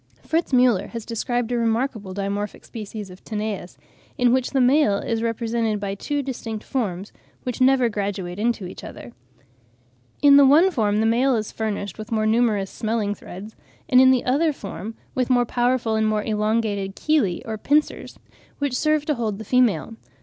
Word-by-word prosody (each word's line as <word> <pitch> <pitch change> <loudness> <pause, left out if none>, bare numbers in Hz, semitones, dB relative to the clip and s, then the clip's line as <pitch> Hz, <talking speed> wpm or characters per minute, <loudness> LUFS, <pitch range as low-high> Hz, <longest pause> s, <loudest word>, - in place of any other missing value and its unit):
Fritz 330 0 -1
Müller 250 -6 +3
has 230 -2 -7
described 240 +1 -2
a 245 - +1
remarkable 225 -3 -1
dimorphic 200 +1 -4
species 210 -3 -7
of 180 - -14
Tanais, 210 - -4 0.4
in 245 -1 +3
which 255 -1 +1
the 275 - 0
male 255 -5 +4
is 225 +2 -2
represented 230 -1 -1
by 200 -1 -3
two 285 +8 -3
distinct 225 -5 -5
forms, 205 -7 -3 0.3
which 250 0 -4
never 255 -1 +4
graduate 200 -4 -4
into 230 -3 0
each 180 - -9
other. 120 - -10 1.1
In 280 -1 +7
the 285 - +8
one 325 +8 +6
form 210 - +1
the - - +2
male 245 +4 +3
is 215 -2 -3
furnished 210 -2 -4
with 215 +2 -8
more 215 -1 +1
numerous 215 -3 +1
smelling 220 -2 -1
threads, 205 +2 -10 0.3
and 255 0 +6
in 260 - +7
the 260 -2 +3
other 295 +6 +2
form 220 -3 -7 0.2
with 255 -1 -1
more 245 -1 +3
powerful 240 -1 0
and 220 0 +1
more 215 -1 0
elongated 210 -2 -1
chelae 280 - +1
or 220 -1 -5
pincers, 295 +6 0 0.4
which 285 -3 -1
serve 305 +1 +1
to 300 - +1
hold 225 -6 -2
the 220 - -8
female. 195 - +1
225 Hz, 175 wpm, -23 LUFS, 205-255 Hz, 1.1 s, the